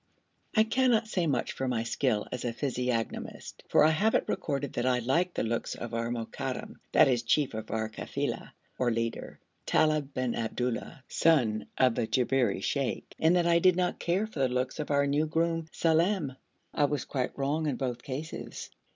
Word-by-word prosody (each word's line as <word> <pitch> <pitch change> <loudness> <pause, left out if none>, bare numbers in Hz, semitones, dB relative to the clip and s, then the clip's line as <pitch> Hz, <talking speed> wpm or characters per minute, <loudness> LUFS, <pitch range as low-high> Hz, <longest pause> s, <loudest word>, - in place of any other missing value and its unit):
I 215 - +6
cannot 230 0 +2
say 180 -5 0
much 130 -5 0
for 135 - -3
my 120 -3 0
skill 115 -2 0
as 125 - -4
a 120 - -1
physiognomist, 125 -3 -3
for - - +5
I 155 - +6
have 210 +8 +2
it - - +2
recorded 140 -7 -2
that 120 - -1
I 125 -1 +3
liked 165 +10 +1
the - - 0
looks 115 +1 -2
of 120 -1 -7
our 115 0 -1
Mokadam 120 +2 -4
(that - - +6
is 125 -3 +2
chief 135 +3 +1
of 110 0 -6
our 110 0 -1
kafila, 110 - -4 0.3
or 125 - +2
leader) 115 0 -3 0.3
Talib 155 -2 +2
bin 130 -2 0
Abdullah, 120 +3 -3
son 120 -10 +2
of 130 -2 +4
the 115 - -1
Jabberi 130 0 +1
sheikh, 140 -3 -2
and 160 +3 +4
that 175 -1 +3
I 170 0 +4
did 185 +1 +5
not 180 0 0
care 185 +5 +1
for 215 -9 -8
the 130 -1 +3
looks 125 +3 -2
of 150 - -3
our 140 -1 +3
new 145 +2 +1
groom, 165 0 0
Salem. 165 -3 +1 0.4
I 145 - +3
was 145 -1 -1
quite 130 -3 -3
wrong 145 +3 0
in 140 - 0
both 125 -2 -3
cases. 145 +5 -6
135 Hz, 190 wpm, -29 LUFS, 120-160 Hz, 0.4 s, I